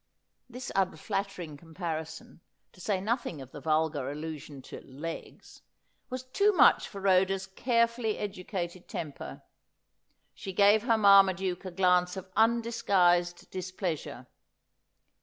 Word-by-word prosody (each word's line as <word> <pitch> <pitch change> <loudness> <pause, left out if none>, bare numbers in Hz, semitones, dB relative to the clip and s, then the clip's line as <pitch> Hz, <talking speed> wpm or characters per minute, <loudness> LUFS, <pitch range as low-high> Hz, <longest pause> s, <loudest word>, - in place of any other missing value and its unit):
"This 250 +1 -7
unflattering 190 -4 -2
comparison, 160 0 -6 0.3
to 185 - -15
say 195 +1 0
nothing 215 - -2
of 130 -1 -10
the 145 - -9
vulgar 155 -2 0
allusion 150 -2 -7
to - - -9
' - - -20 0.2
legs,' 165 0 -8 0.5
was 255 0 -5
too 400 +11 +2
much 335 - +5
for 200 - -9
Rhoda's 190 0 +2
carefully 230 +2 0
educated 185 -3 -5
temper. 150 -4 -7 0.9
She 190 - -7
gave 205 +3 +5
her 230 -2 +4
Marmaduke 195 -3 +4
a - - -3
glance 180 0 +2
of 190 0 -8
undisguised 200 -7 +2
dis 185 0 -5
pleasure. 180 -5 -4
185 Hz, 120 wpm, -29 LUFS, 165-210 Hz, 0.9 s, much